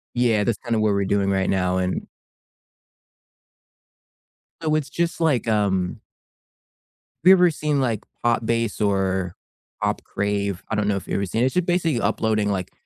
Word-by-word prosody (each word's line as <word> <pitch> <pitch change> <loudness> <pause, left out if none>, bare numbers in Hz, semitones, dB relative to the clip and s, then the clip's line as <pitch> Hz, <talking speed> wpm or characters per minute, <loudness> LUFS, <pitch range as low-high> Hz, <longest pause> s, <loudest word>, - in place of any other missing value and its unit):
Yeah, 115 -4 +2
that's 115 0 0
kinda 115 -3 -1
what 110 -1 +2
we're 100 0 0
doing 100 0 +1
right 95 -1 +1
now, 90 -1 +1
and 95 0 -2 2.5
So 155 -1 +1
it's 145 -2 -1
just, 170 +2 -2
like, 145 -8 +2
um 100 -4 0 1.2
have 185 - +6
you - - +11
ever 180 -2 +5
seen, 150 -2 -1
like, 115 -5 -1 0.2
Pop 120 -1 +1
Bass 115 -1 -1
or 95 -3 0 0.5
Pop - - -1
Crave? 100 -2 -2
I 110 - -1
don't 105 -1 0
know 100 - +1
if 95 - -5
you've - - -2
ever 100 - 0
seen 110 +6 -1
it, - - +4
it's 130 - -4
just 180 -1 +2
basically 170 -7 +1
uploading 110 -2 +1
like 95 -2 -3
110 Hz, 175 wpm, -23 LUFS, 100-130 Hz, 2.5 s, you